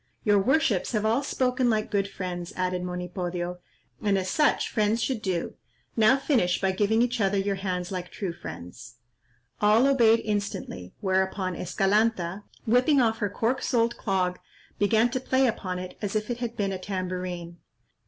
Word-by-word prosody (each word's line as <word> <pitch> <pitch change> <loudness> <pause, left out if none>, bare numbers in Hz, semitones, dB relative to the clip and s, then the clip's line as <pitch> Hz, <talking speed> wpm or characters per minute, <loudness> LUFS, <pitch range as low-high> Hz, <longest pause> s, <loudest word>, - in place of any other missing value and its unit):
"Your 205 -1 +4
worships 245 - +2
have 215 -1 0
all 225 +5 +2
spoken 255 -2 +1
like 215 -1 0
good 200 -1 +1
friends," 175 -3 -5
added 185 0 -1
Monipodio, 180 0 -4 0.4
"and 205 -2 +2
as 185 -1 -2
such 300 -1 +2
friends 215 0 +1
should 255 -5 -1
do; 185 -4 -2 0.4
now 225 +4 +5
finish 245 - +1
by 190 -1 +1
giving 215 +4 +2
each 245 -1 -1
other 200 0 +2
your 195 0 0
hands 180 -2 -3
like 180 -1 -4
true 190 -5 -4
friends." 120 - -9 0.7
All 215 +4 +5
obeyed 230 -5 +5
instantly, 200 - -3
whereupon 190 -1 0
Escalanta, 195 0 +1 0.2
whipping 255 +5 +4
off 225 -3 +2
her 205 -3 0
cork 230 +5 -1
soled 235 -1 +1
clog, 185 -3 -1 0.4
began 220 +3 +3
to 255 - -1
play 260 +1 +2
upon 190 -6 -2
it 180 0 -7
as 205 0 -3
if 215 +2 -1
it 240 - -3
had 235 -1 -4
been 200 -3 0
a 190 - -4
tambourine. 180 -2 -4
200 Hz, 165 wpm, -27 LUFS, 185-230 Hz, 0.7 s, now